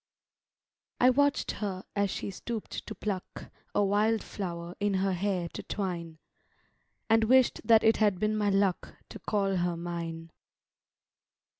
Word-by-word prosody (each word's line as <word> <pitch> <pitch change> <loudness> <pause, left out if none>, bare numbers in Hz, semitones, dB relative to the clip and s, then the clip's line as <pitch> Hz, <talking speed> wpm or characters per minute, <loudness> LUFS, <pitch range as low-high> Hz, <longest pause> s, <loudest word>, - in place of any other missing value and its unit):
I 250 +1 +6
WATCH'D 285 +2 +2
her 195 -3 -3
as 200 -1 +1
she 200 - -4
stoop'd 225 +3 -6
to 215 - -6
pluck 195 -2 -5 0.2
A 205 - +3
wildflower 195 -4 -1
in 205 -1 +1
her 190 0 +1
hair 185 -1 -1
to - - -7
twine; 170 -5 -4 0.9
And 225 0 +4
wish'd 260 +2 +4
that 225 -2 +5
it 225 0 +4
had 205 -4 +2
been 215 +1 +1
my 210 -1 +1
luck 195 -2 0
To - - -9
call 195 -2 0
her 175 -1 0
mine. 165 -1 -5
200 Hz, 140 wpm, -29 LUFS, 180-215 Hz, 0.9 s, I